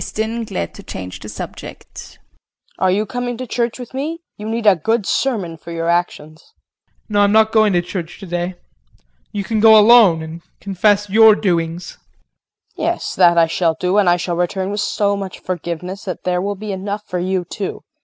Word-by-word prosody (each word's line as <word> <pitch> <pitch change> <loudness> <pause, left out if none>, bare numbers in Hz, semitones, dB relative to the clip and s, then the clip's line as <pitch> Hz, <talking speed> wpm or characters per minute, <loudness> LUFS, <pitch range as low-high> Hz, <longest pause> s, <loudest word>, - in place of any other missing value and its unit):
KRISTIN 225 +2 -3
[Glad 85 - -4
to - - -11
change 90 -1 -7
the - - -9
subject]. - - -9 0.6
Are 185 - +2
you 205 +4 +1
coming 245 0 -4
to 255 - -5
church 235 -1 -2
with 250 0 -10
me? 315 +6 -4
You 210 +1 -7
need 230 0 -2
a 205 -2 +7
good 220 +6 0
sermon 195 -13 -1
for 170 - -13
your 165 0 -2
actions. 160 -3 -2
JEAN. - - -34 0.2
No, 205 -1 +2
I'm 200 0 +4
not 220 0 +4
going 215 -2 +4
to 175 -1 +2
church 175 -1 -6
today. 175 -1 -4 0.8
You 205 - -3
can 220 +2 -1
go 220 0 +8
alone 210 -7 +6
and 160 +1 -8 0.2
confess 205 +1 +1
your 220 +1 +6
doings. 170 -3 -2
KRISTIN. - - -42 0.7
Yes, - - -1
that 175 -2 +4
I 165 - +6
shall 165 0 0
do, 185 +3 +2
and 195 -4 +4
I 175 - +4
shall 175 -1 -3
return 185 +2 -1
with 205 - -3
so 200 0 0
much 195 -2 -6
forgiveness 180 +3 -5
that 185 -3 -5
there 180 -1 0
will 200 +2 -2
be 210 +1 -6
enough 200 +2 -4
for 180 - -3
you 185 0 -1
too. 195 +3 -5
195 Hz, 195 wpm, -18 LUFS, 175-215 Hz, 0.8 s, go